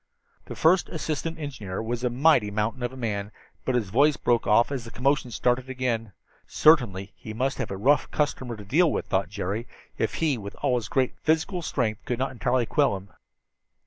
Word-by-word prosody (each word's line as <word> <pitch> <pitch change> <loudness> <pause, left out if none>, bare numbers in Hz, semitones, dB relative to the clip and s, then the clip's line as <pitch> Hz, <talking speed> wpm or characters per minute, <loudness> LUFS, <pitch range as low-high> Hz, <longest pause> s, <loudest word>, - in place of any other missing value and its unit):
The - - -8
first 175 +3 +3
assistant 160 0 -3
engineer 125 -12 -5
was 115 +2 -3
a 125 - +2
mighty 125 -3 +4
mountain 105 +4 -2
of 120 0 -2
a 130 - -11
man, 105 -4 -3 0.3
but 130 - 0
his 110 -6 0
voice 145 +5 +4
broke 120 -3 +1
off 110 +6 +4
as 135 -4 -3
the 115 - -9
commotion 130 +3 0
started 125 +3 0
again. 120 -4 -2 0.4
Certainly 100 - +3
he 110 -1 -9
must 130 +3 -1
have - - -2
a 95 - -4
rough 140 +9 +3
customer 130 -5 -2
to 105 - -10
deal 160 - +3
with, - - -2
thought 95 -1 0
Jerry, 100 +3 -3 0.3
if - - 0
he, 150 -7 0
with 100 0 -8
all 135 -3 +2
his 120 - -4
great 130 -2 +1
physical 160 +4 0
strength, 115 -8 -2
could 120 - -2
not 130 +1 -1
entirely 125 -1 0
quell 140 -6 +2
him. 95 +1 -13
125 Hz, 200 wpm, -26 LUFS, 110-140 Hz, 0.4 s, mighty